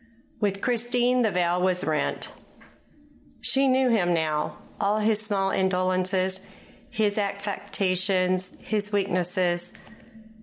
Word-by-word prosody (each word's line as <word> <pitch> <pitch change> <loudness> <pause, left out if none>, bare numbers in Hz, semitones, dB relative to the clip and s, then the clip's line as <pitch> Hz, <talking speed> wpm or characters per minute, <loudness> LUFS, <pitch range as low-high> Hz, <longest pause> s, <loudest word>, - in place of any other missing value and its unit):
With 200 -2 -1
Christine 245 +1 +1
the 225 - +3
veil 180 -1 0
was 185 0 +1
rent. 155 -1 -1 1.1
She 275 0 +3
knew 260 0 +3
him 175 -6 +2
now 155 -2 -1 0.2
all 205 +2 +1
his 215 0 +2
small 195 -3 0
indolences, 185 0 +1 0.4
his 210 -1 0
affectations, 190 -2 0
his 210 -1 -3
weaknesses. 180 -3 0
195 Hz, 105 wpm, -25 LUFS, 185-215 Hz, 1.1 s, the